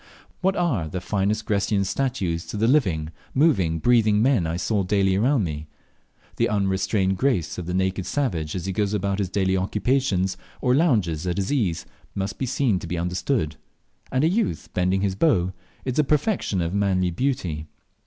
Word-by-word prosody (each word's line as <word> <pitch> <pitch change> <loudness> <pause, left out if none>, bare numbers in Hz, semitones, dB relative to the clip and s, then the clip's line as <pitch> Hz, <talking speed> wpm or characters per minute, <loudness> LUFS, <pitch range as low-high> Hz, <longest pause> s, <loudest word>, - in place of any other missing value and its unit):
What 190 +1 +1
are 130 - 0
the 90 +4 -4
finest 105 +3 -1
Grecian 100 -1 +1
statues 95 -9 -1
to - - -5
the 110 +2 +2
living, 90 - +2 0.2
moving, 110 - +3
breathing 110 +2 +3
men 120 -7 +3
I 80 +1 -2
saw 105 +3 0
daily 95 0 +2
around 120 +4 +2
me? 75 -2 -4 0.7
The - - +2
unrestrained 95 -1 +1
grace 125 - 0
of 85 - -6
the 90 - -2
naked 95 0 0
savage 90 - -1
as 90 - -4
he 95 - -2
goes 105 +1 0
about 100 0 -1
his 95 -3 -1
daily 95 -1 +1
occupations, 95 -1 0 0.2
or 125 -2 +2
lounges 105 - +2
at 90 - -1
his 100 +7 -1
ease, 100 - 0 0.3
must 100 +1 -3
be 130 - -1
seen 120 -6 +1
to 85 - -7
be 90 +1 -3
understood; 90 - -1 0.5
and 130 +2 +1
a - - +5
youth 205 +4 -1
bending 90 +1 +1
his 100 -1 0
bow 95 - +2 0.3
is 130 -2 -2
the 150 - +5
perfection 150 - 0
of 85 +1 -2
manly 95 -3 +1
beauty. 90 - -2
100 Hz, 180 wpm, -24 LUFS, 90-125 Hz, 0.7 s, a